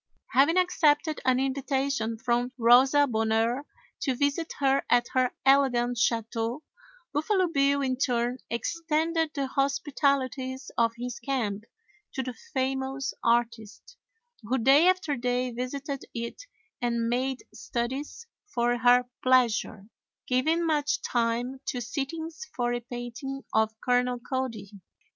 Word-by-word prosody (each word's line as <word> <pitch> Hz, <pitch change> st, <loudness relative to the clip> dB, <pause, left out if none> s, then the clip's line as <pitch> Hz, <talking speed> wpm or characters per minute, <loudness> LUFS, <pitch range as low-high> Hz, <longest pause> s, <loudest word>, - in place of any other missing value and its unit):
Having 285 Hz, +7 st, +4 dB
accepted 315 Hz, -4 st, +2 dB
an 255 Hz, 0 st, +3 dB
invitation 270 Hz, -3 st, -1 dB
from 240 Hz, +2 st, 0 dB
Rosa 260 Hz, +5 st, +6 dB
Bonheur 225 Hz, +2 st, 0 dB, 0.3 s
to 265 Hz, -3 st, -1 dB
visit 285 Hz, +5 st, 0 dB
her 275 Hz, -1 st, +2 dB
at 240 Hz, 0 st, +3 dB
her 255 Hz, -1 st, +3 dB, 0.2 s
elegant 245 Hz, -3 st, +3 dB
chateau, 230 Hz, +3 st, -1 dB, 0.5 s
Buffalo 370 Hz, +5 st, +1 dB
Bill 280 Hz, -2 st, +2 dB
in 255 Hz, -1 st, 0 dB
turn 245 Hz, -1 st, 0 dB
extended 325 Hz, +5 st, 0 dB
the 280 Hz, -2 st, 0 dB
hospitalities 275 Hz, -1 st, -1 dB
of 230 Hz, -1 st, +2 dB
his 245 Hz, 0 st, -5 dB
camp 230 Hz, -5 st, -2 dB, 0.5 s
to 265 Hz, -, -1 dB
the 255 Hz, 0 st, -5 dB
famous 265 Hz, +2 st, -3 dB
artist, 235 Hz, -, -1 dB, 0.5 s
who 240 Hz, +4 st, -1 dB
day 270 Hz, +7 st, +5 dB
after 365 Hz, -6 st, +2 dB
day 250 Hz, 0 st, -1 dB
visited 275 Hz, +3 st, -4 dB
it 235 Hz, -, -6 dB, 0.3 s
and 235 Hz, -1 st, 0 dB
made 255 Hz, +2 st, -1 dB
studies 265 Hz, -, -4 dB, 0.2 s
for 240 Hz, -7 st, 0 dB
her 245 Hz, 0 st, +5 dB
pleasure, 235 Hz, -5 st, +2 dB, 0.4 s
giving 315 Hz, +7 st, +1 dB
much 310 Hz, -, 0 dB
time 240 Hz, +2 st, -1 dB
to 250 Hz, -, -2 dB
sittings 315 Hz, -, -5 dB
for 240 Hz, -1 st, 0 dB
a 240 Hz, -, -1 dB
painting 245 Hz, +3 st, -6 dB
of 220 Hz, 0 st, +1 dB
Colonel 250 Hz, 0 st, +2 dB
Cody. 245 Hz, -5 st, -4 dB
255 Hz, 120 wpm, -27 LUFS, 240-280 Hz, 0.5 s, Rosa